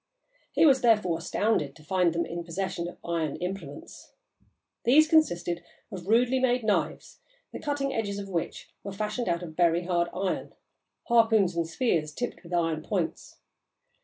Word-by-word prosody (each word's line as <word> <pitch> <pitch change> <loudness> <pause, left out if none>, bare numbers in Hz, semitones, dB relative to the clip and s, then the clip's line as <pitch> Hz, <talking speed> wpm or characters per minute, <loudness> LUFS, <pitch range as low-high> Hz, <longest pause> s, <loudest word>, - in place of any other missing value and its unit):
He - - +4
was, 270 -3 +5
therefore, 210 -8 +3
astounded 170 -5 0
to 155 - -16
find 180 +1 +2
them 170 +1 -1
in 170 0 -5
possession 175 0 -3
of 175 - -9
iron 165 -3 -1
implements. 180 -6 -7 0.7
These 305 +6 +6
consisted 175 - +2 0.3
of 185 -1 -7
rudely 245 +4 +3
made 250 -1 +2
knives, 210 -2 -1 0.3
the - - -5
cutting 285 -2 -2
edges 205 -3 -2
of 200 -1 -5
which 175 -4 -4
were 200 - -6
fashioned 215 +2 -2
out 170 +1 0
of 160 -3 -8
very 170 0 +3
hard 175 -1 +1
iron; 190 0 -3 0.5
harpoons 225 -6 +3
and 170 -1 0
spears, 160 -5 0
tipped 245 - -4
with 170 - -14
iron 165 -3 0
points. 170 -2 -3
185 Hz, 160 wpm, -28 LUFS, 170-225 Hz, 0.7 s, These